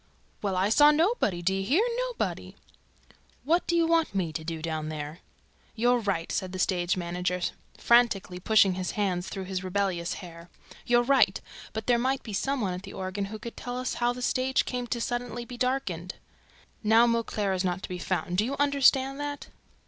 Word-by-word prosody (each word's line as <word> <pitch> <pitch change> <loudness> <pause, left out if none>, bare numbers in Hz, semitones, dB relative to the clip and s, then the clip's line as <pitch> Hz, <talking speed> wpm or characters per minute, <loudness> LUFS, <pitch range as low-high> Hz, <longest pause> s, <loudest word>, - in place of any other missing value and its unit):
"Well, 195 -3 -1
I 190 +2 +2
saw 295 +7 +7
nobody! 300 - +1
Do 190 +2 +2
you 195 0 -1
hear 295 - +3 0.2
nobody!" - - -4 0.9
"What 335 +6 +1
do 340 - +1
you 335 -1 +4
want 330 -8 +2
me 175 -5 -1
to 160 - -4
do 165 0 -4
down 155 -1 -3
there 150 0 -5
for?" - - -35
"You're 245 +2 +3
right!" 195 -6 -2
said 185 -2 -2
the - - -4
stage 180 -1 +1
manager, 180 +1 -2 0.4
frantically 225 -7 +3
pushing 200 0 +4
his 185 0 -3
hands 185 -3 0
through 195 - -5
his 185 0 -4
rebellious 185 -2 -1
hair. 170 -2 -10 0.4
"You're 240 0 +4
right! 270 +2 +3 0.3
But 220 0 -5
there 240 -1 +3
might 260 +2 0
be 215 - -7
some 275 +6 -1
one 190 -4 -1
at 180 - -5
the 195 - -10
organ 190 +2 -3
who 215 +2 -7
could 235 +2 -8
tell 245 0 -5
us 255 0 -2
how 240 0 +1
the 250 0 -6
stage 260 +1 +1
came 250 -1 -3
to 240 - -2
be - - -4
suddenly 240 0 -3
darkened. 245 -9 -2 0.7
Now 225 +2 +5
Mauclair 230 -4 0
is 185 0 -1
nowhere 185 0 -1
to - - -7
be 180 -1 -5
found. 180 0 -1
Do 215 - +3
you 275 +3 -2
understand 275 -1 +3
that?" 290 0 -5
210 Hz, 200 wpm, -28 LUFS, 180-250 Hz, 0.9 s, saw